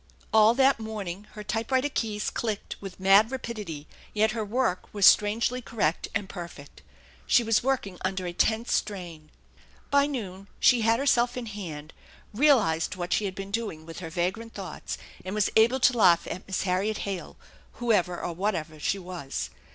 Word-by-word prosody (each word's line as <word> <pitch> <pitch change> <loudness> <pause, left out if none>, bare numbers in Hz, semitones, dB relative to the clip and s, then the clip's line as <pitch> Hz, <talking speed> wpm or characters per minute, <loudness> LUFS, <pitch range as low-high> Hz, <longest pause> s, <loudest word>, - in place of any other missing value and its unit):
All 220 +1 +6
that 270 -1 +4
morning 210 -3 -6
her 210 - -8
typewriter 230 +6 0
keys 215 -6 -2
clicked 215 -3 -3
with 195 -2 -8
mad 195 +3 +6
rapidity, 210 - -6 0.3
yet 215 +1 +3
her 220 -1 -2
work 210 -3 -1
was 200 -2 +4
strangely 225 +6 +4
correct 205 -9 -1
and 205 -3 -1
perfect. 170 -7 -9 0.5
She 240 - +5
was 225 -1 +2
working 245 -8 -1
under 185 0 -2
a 175 - -4
tense 220 +6 +1
strain. 170 -7 -3 0.6
By 280 0 +4
noon 200 -8 -6
she 245 -2 +5
had 225 +1 +3
herself 245 -2 +2
in 245 - -4
hand, 165 -8 -7 0.4
realized 210 - +3
what 175 -1 -2
she 210 - +1
had 190 -2 -4
been 195 0 -6
doing 200 -8 -3
with 165 0 -8
her 165 -3 -6
vagrant 190 +7 -3
thoughts, - - -6 0.3
and 185 +2 -5
was 210 -2 +1
able 235 +4 +5
to 250 -1 +4
laugh 180 -7 +5
at 185 - -7
Miss 190 - -1
Harriet 195 +3 0
Hale 195 -3 -5 0.4
whoever 195 -7 +1
or 175 - -4
whatever 165 -4 -2
she 195 - 0
was. 170 - -5
205 Hz, 170 wpm, -27 LUFS, 180-230 Hz, 0.6 s, All